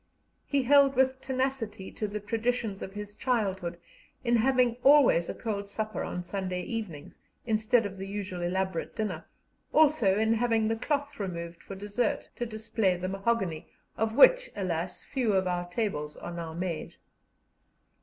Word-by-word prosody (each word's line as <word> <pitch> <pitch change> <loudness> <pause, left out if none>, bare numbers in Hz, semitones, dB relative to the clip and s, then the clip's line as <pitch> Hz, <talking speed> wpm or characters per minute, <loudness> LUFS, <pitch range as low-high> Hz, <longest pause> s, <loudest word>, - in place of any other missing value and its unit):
He 280 -2 +1
held 275 +1 +5
with 260 0 +2
tenacity 255 -7 -2
to 215 - -3
the 210 +1 -4
traditions 225 -1 -1
of 190 - -5
his 205 0 -7
childhood 195 -8 -1 0.5
in 240 -1 +3
having 250 0 +3
always 275 - +6
a - - -3
cold 200 -3 -4
supper 215 -1 -3
on 180 - -4
Sunday 185 -1 -3
evenings, 200 -9 -6 0.3
instead 225 +1 +2
of 195 -1 -6
the 195 - -5
usual 195 -3 -4
elaborate 185 0 -2
dinner, 185 -7 -3 0.5
also 290 -11 +4
in 220 +1 +3
having 225 -1 +2
the 225 - +1
cloth 285 +3 -2
removed 170 -3 -5
for 195 - -8
dessert, 205 +5 -2
to 240 - -2
display 220 -3 0
the 185 +1 -3
mahogany, 195 -5 -1 0.3
of 220 0 -1
which, - - +7
alas! 180 -3 -3
few 245 -6 0
of 190 -1 +2
our 175 -1 -2
tables 150 -8 -2
are 175 - -7
now 170 -1 -5
made. 170 -1 -4
210 Hz, 155 wpm, -29 LUFS, 185-240 Hz, 0.5 s, which